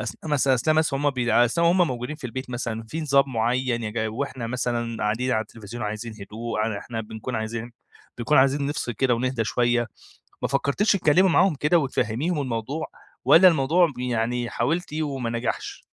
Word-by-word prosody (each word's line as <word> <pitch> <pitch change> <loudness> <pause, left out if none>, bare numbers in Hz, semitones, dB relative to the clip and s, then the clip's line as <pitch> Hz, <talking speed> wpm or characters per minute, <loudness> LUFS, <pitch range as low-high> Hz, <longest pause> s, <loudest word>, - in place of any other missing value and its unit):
أثناء 155 - -5
مثلًا 135 -2 +3
أثناء 155 +6 +1
مث 155 -3 +2
همَّ 145 +1 +1
بيع 120 -2 +3
أثناء 170 +8 +1
وهمَّ 175 0 +4
موجودين 125 +4 -4
في 150 - -14
البيت 130 +2 -6
مثلًا 115 -2 -4
في 160 +7 -4
نظام 140 -3 +3
مُعيّن؟ 120 +1 0
يج 110 +1 -3
وإحنا 130 +1 -4
مثلًا 120 -1 -2
قاعدين 115 +5 0
على 110 - +2
التلفزيون 115 +2 -9
عايزين 110 +2 -4
هدوء، 110 +3 -5
ع 110 -1 -1
إحنا 115 -2 -5
بنكون 110 +3 -6
عايزين 115 +2 -4 0.5
بنكون 135 +6 +3
عايزين 140 +1 +3
نفصِل 145 -4 -2
كده 130 +1 +1
ونهدى 125 -1 -1
شوية، 120 +1 +1 0.6
ما - - 0
فكرتيش 140 +10 +1
تتكلِّمي 185 0 +4
معاهم 180 0 +4
كده 150 +5 +2
وتفهميهم 135 +3 -1
الموضوع، 130 +4 -3 0.4
والّا 185 +3 +8
الموضوع 160 +2 +3
يعني 120 0 -1
حاولتِ 155 +6 -1
وما 135 -6 -3
نجحش؟ 115 +1 -4
125 Hz, 175 wpm, -24 LUFS, 115-145 Hz, 0.6 s, والّا